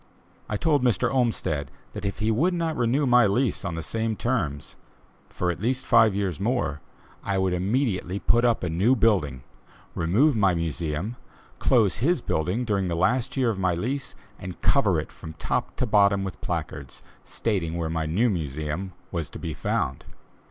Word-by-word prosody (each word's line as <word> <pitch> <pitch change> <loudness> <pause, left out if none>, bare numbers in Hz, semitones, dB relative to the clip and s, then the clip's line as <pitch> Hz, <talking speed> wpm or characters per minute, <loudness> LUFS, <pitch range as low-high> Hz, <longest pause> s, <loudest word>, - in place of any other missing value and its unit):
I 105 - -1
told 145 +4 +2
Mr. 125 +1 +1
Olmsted 115 - 0 0.2
that - - -6
if 100 - -2
he 110 +1 +1
would 165 +11 +2
not 165 -2 -1
renew 125 +4 +1
my 125 -3 +5
lease 120 +2 0
on 85 - -3
the 80 - -4
same 110 +5 -1
terms, 90 - -2 0.5
for 90 -1 -1
at 85 - -6
least 130 +5 -1
five 115 -5 +5
years 95 -5 -1
more, 100 - -1 0.4
I 100 -1 -1
would 95 -1 +1
immediately 95 0 0
put 120 +3 +2
up 120 -5 +2
a 90 - -1
new 100 +11 +3
building, 85 - +1 0.5
remove 110 - +3
my 100 -5 +3
Museum, 85 - -2 0.4
close 110 -8 +3
his 150 - +2
building 95 +4 -1
during 100 -4 0
the 85 - -1
last 125 +10 +1
year 125 -3 +3
of 100 - -5
my 90 -2 +1
lease, 125 +10 -3 0.2
and 90 -1 -7
cover - - +3
it - - -6
from 80 - -10
top 80 - -2
to - - 0
bottom 100 -1 +3
with 90 -8 -6
placards, 70 -2 -5 0.2
stating 90 -7 -2
where 85 -1 -1
my 80 -1 -2
new 100 +10 +2
Museum 80 - -3 0.2
was 85 -4 -3
to - - -9
be - - -4
found. 65 0 -2
100 Hz, 180 wpm, -25 LUFS, 85-120 Hz, 0.5 s, my